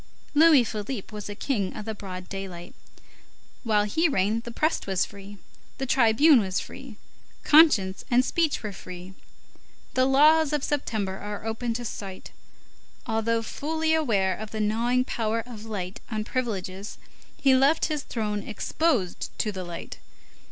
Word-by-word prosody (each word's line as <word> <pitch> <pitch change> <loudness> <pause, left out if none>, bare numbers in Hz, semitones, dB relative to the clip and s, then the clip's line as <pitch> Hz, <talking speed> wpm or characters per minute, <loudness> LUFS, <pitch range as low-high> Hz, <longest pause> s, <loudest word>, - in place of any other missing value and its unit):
Louis 300 -3 +7
Philippe 215 0 -5
was 210 -1 -6
a 205 - -5
king 205 -5 -2
of 210 - -6
the 220 - -3
broad 185 -3 -8
daylight. 185 -3 -7 0.9
While 215 -3 +2
he 320 +11 +1
reigned 215 0 0
the 235 - -6
press 310 +2 0
was 190 -2 +1
free, 200 0 -11 0.4
the 270 - -2
tribune 255 +3 +5
was 190 -3 -1
free, 265 -5 -9 0.5
conscience 255 -12 +5
and 250 +1 +4
speech 320 -5 0
were 210 - -3
free. 180 0 -9 0.8
The 255 0 +3
laws 305 +3 +5
of 295 -2 0
September 215 -9 -2
are 205 +1 -6
open 225 +1 -2
to 240 +1 -4
sight. 195 -3 -7 0.7
Although 225 0 0
fully 315 +6 -1
aware 205 -12 +2
of 215 +2 -7
the 220 - -5
gnawing 235 +4 +1
power 225 -1 -1
of 225 -3 -10
light 195 -4 -5
on 215 -2 -2
privileges, 205 -5 -4 0.4
he 270 -1 +4
left 275 +5 +4
his 305 -2 -2
throne 210 -5 -3
exposed 225 - -1
to 215 - 0
the 190 -2 -5
light. 175 -1 -8
220 Hz, 150 wpm, -26 LUFS, 200-265 Hz, 0.9 s, Louis